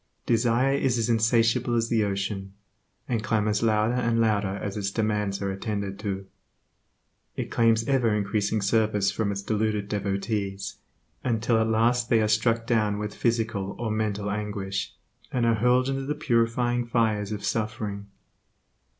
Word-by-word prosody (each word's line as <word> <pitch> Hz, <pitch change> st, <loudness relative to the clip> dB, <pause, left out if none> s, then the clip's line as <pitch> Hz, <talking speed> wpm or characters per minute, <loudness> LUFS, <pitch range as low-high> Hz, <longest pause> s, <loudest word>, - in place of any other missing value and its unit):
Desire 120 Hz, +3 st, +2 dB
is 135 Hz, -3 st, +1 dB
as 115 Hz, 0 st, 0 dB
insatiable 115 Hz, +2 st, +2 dB
as 115 Hz, 0 st, +1 dB
the 115 Hz, -2 st, +2 dB
ocean, 100 Hz, -1 st, -3 dB, 0.5 s
and 115 Hz, -3 st, -1 dB
clamors 105 Hz, -2 st, +1 dB
louder 110 Hz, 0 st, +2 dB
and 115 Hz, -2 st, +1 dB
louder 105 Hz, -3 st, +1 dB
as 100 Hz, -1 st, -4 dB
its 100 Hz, -2 st, -1 dB
demands 105 Hz, -2 st, -1 dB
are 100 Hz, -, -1 dB
attended 100 Hz, 0 st, -4 dB
to. 100 Hz, -2 st, -3 dB, 1.1 s
It -, -, -4 dB
claims 115 Hz, 0 st, +3 dB
ever 125 Hz, -6 st, +2 dB
increasing 105 Hz, +1 st, 0 dB
service 105 Hz, -1 st, +2 dB
from 105 Hz, -1 st, -1 dB
its 100 Hz, 0 st, -4 dB
deluded 105 Hz, -1 st, -1 dB
devotees, 100 Hz, 0 st, -2 dB, 0.5 s
until 115 Hz, -1 st, +1 dB
at 110 Hz, -, +2 dB
last 115 Hz, +2 st, +2 dB
they 115 Hz, -, +4 dB
are 110 Hz, -, +2 dB
struck 115 Hz, +2 st, +2 dB
down 105 Hz, -3 st, +1 dB
with 105 Hz, 0 st, -4 dB
physical 110 Hz, -4 st, -1 dB
or 115 Hz, -2 st, -2 dB
mental 105 Hz, -1 st, -1 dB
anguish, 100 Hz, -1 st, -3 dB, 0.4 s
and 120 Hz, -2 st, +1 dB
are 115 Hz, -, +4 dB
hurled 125 Hz, +3 st, +3 dB
into 135 Hz, 0 st, -2 dB
the 150 Hz, -, -1 dB
purifying 120 Hz, -3 st, +1 dB
fires 110 Hz, -3 st, +1 dB
of 105 Hz, -2 st, -4 dB
suffering. 105 Hz, -2 st, -3 dB
110 Hz, 150 wpm, -26 LUFS, 100-115 Hz, 1.1 s, they